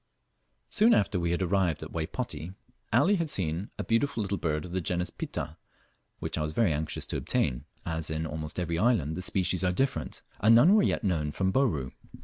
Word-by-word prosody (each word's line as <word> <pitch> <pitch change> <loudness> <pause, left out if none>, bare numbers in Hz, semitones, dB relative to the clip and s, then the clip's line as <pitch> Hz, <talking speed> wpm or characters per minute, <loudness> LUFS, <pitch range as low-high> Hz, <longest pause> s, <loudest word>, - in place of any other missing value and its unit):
Soon 225 +3 +5
after 100 -2 +1
we 85 0 0
had 85 +2 0
arrived 90 -4 +1
at 80 - -8
Waypoti, 85 - -4 0.4
Ali 200 +2 +4
had 165 -3 -1
seen 90 - -1
a - - -2
beautiful 115 0 +1
little 100 0 -2
bird 75 -1 -1
of 90 - -9
the 95 +1 -1
genus 90 +1 -1
Pitta, 80 +2 -5 0.6
which - - -3
I - - -1
was 75 0 -2
very 105 -6 +3
anxious 75 +1 -2
to - - -3
obtain, - - 0 0.2
as 80 -1 -1
in 80 +1 -2
almost 80 +1 -4
every 85 -1 -1
island 100 - +2
the 90 - -4
species 90 0 0
are 90 - +3
different, 135 +9 -1 0.2
and 110 +3 +6
none 155 - +7
were 215 - +6
yet - - +1
known 80 -7 0
from 95 +4 0
Bourn. 85 - +1
90 Hz, 200 wpm, -29 LUFS, 80-110 Hz, 0.6 s, none